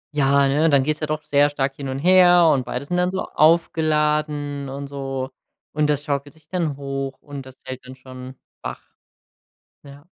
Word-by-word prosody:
Ja, 140 -1 +4
ne? 150 +4 +3
Dann 140 -2 +4
geht's 155 +1 -1
ja 155 - -2
doch 155 0 -3
sehr 145 +1 +3
stark 135 -1 -2
hin 135 -2 -6
und 130 - -3
her, 175 +1 +6
und 130 -2 -1
beide 130 +3 -4
sind 180 +4 -2
dann 180 0 +2
so 190 - -3
aufgeladen 150 -3 +1
und 140 +1 -6
so. 135 -1 -5 0.4
Und 150 0 +1
das 145 0 0
schaukelt 145 0 -3
sich 155 -1 -24
dann 165 -5 -2
hoch, 135 -1 -4
und 140 -2 -9
das 130 - -14
hält 130 0 -7
dann 130 +1 -11
schon 130 0 -11 0.3
wach. - - -5 1.0
Ja. 140 0 -14
145 Hz, 190 wpm, -22 LUFS, 135-155 Hz, 1.0 s, her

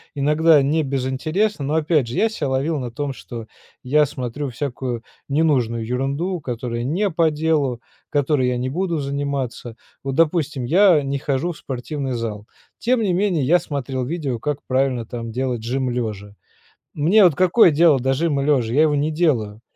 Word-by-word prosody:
иногда 150 +2 +4
не 155 +4 +1
без 135 -2 -2
интереса. 155 +7 -1
Но 145 +3 -2
опять 155 -5 +2
же 120 - -5
я 225 - +2
себя 155 -10 -3
ловил 140 +3 0
на 125 -2 -5
том, 140 +3 -3
что 115 -3 -9 0.4
я 150 +4 +3
смотрю 130 +1 -5
всякую 125 -2 -4 0.3
ненужную 130 -7 +1
ерунду, 140 +9 -2
которая 120 -2 -4
не 185 +10 0
по 165 -1 +3
делу, 150 -6 0 0.3
которой 145 -2 +1
я 125 - -1
не 130 +1 -2
буду 170 +1 -1
заниматься. 140 -4 -3 0.3
Вот, 135 -1 -3
допустим, 155 -4 +1
я 175 +2 +5
не 140 0 -2
хожу 140 +5 -1
в - - -14
спортивный 135 +1 -4
зал, 110 -3 -4 0.3
тем 245 0 +1
не 200 -4 +1
менее 180 -5 +1
я 175 +5 +4
смотрел 135 -3 -4
видео 140 -6 -3
как 145 +3 -2
правильно 130 -3 0
там 115 -1 -6
делать 125 -2 -2
жим 130 +2 -1
лежа. 105 -4 -4 0.6
Мне 180 +8 +4
вот 170 -6 +5
какое 185 +2 +5
дело 150 -2 +4
до 130 +2 +1
жима 145 -1 0
лежа? 125 -6 +1
Я 150 - +4
его 150 -2 +2
не 150 +2 0
делаю 120 -10 0
140 Hz, 175 wpm, -21 LUFS, 125-160 Hz, 0.6 s, я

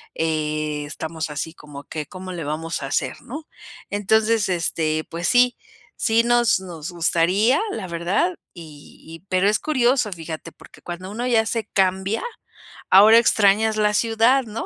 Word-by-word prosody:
estamos 155 0 -3
así 150 +2 -5
como 145 -3 -11
que: 150 +1 -6
"¿Cómo 185 0 -8
le 170 -2 -5
vamos 160 +2 -4
a 135 - -4
hacer?", 130 -1 -2
¿no? 300 +6 -9 0.4
Entonces, 215 +1 +2
este, 160 -2 -1
pues 170 +1 -3
sí, 245 0 +4 0.4
sí 230 -1 +2
nos 240 -3 +3
nos 175 -3 -8
gustaría, 180 - +2
la 195 -4 -5
verdad, 180 - 0 0.2
y 155 -4 -13
y 165 0 -10
pero 185 +2 +2
es 215 - +1
curioso, 250 -6 +1
fíjate, 165 -1 -7
porque - - -18
cuando 185 +2 -7
uno 240 +4 -3
ya 225 -2 +3
se 225 0 -2
cambia, 190 +2 +1 0.7
ahora 210 +4 +8
extrañas 220 -1 +3
la 210 -1 +2
ciudad, 230 +4 +3
¿no? 220 0 -6
190 Hz, 150 wpm, -22 LUFS, 160-225 Hz, 0.7 s, ahora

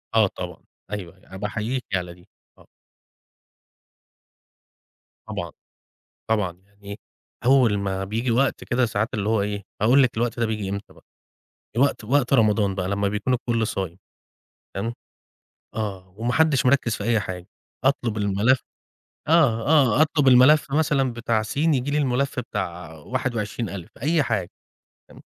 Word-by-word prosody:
آه 110 -2 +5
طبعًا. 90 -2 -8 0.3
أيوه، 95 -4 -6
أنا 95 0 -12
باحييكِ 110 +5 -3
على 90 -1 -3
دي. 90 +2 -20 0.3
آه. - - -20 2.6
طبعًا، - - -5 0.8
طبعًا، 105 -5 +1
يعني 100 0 -11 0.5
أول 125 -5 +4
ما 95 -1 -2
بييجي 115 +5 -2
وقت 130 +3 +1
كده 125 +1 +1
ساعات 110 0 -1
اللي 105 -2 -1
هو 110 -2 +2
إيه، 100 0 -3 0.2
هاقول 125 +6 +6
لِك 125 -4 +1
الوقت 120 +1 -1
ده 115 - +2
بييجي 105 -3 -3
إمتى 100 +1 -5
بقى. - - -21 0.7
وقت 140 -3 +2
وقت 125 +2 +1
رمضان 105 -5 +3
بقى 95 -1 -2
لمّا 100 0 0
بيكون 105 +5 0
الكل 115 -2 0
صايم، 95 -4 -4 0.8
تمام، 115 +5 -3 0.8
آه، 100 -4 -4
وما 120 +3 -1
حدش 155 -2 +3
مِركِّز 125 -3 +3
في 100 - -6
أي 115 -1 +2
حاجة، 90 -2 -6 0.4
أطلب 120 -5 +1
الملف 105 +5 +2 0.7
آه، 135 -9 +3
آه، 145 -3 +4
أطلب 150 -3 +3
الملف 130 +3 +6
مثلًا 145 -4 +2
بتاع 115 -1 0
سين 145 +8 +1
ييجي 130 +1 -1
لي 145 - +1
الملف 140 -1 0
بتاع 90 -7 -5
21 115 - -3
ألِف، 95 -3 -8
أي 155 +2 +2
حاجة، 105 -8 -2 0.6
تمام. - - -15
110 Hz, 145 wpm, -24 LUFS, 100-130 Hz, 2.6 s, هاقول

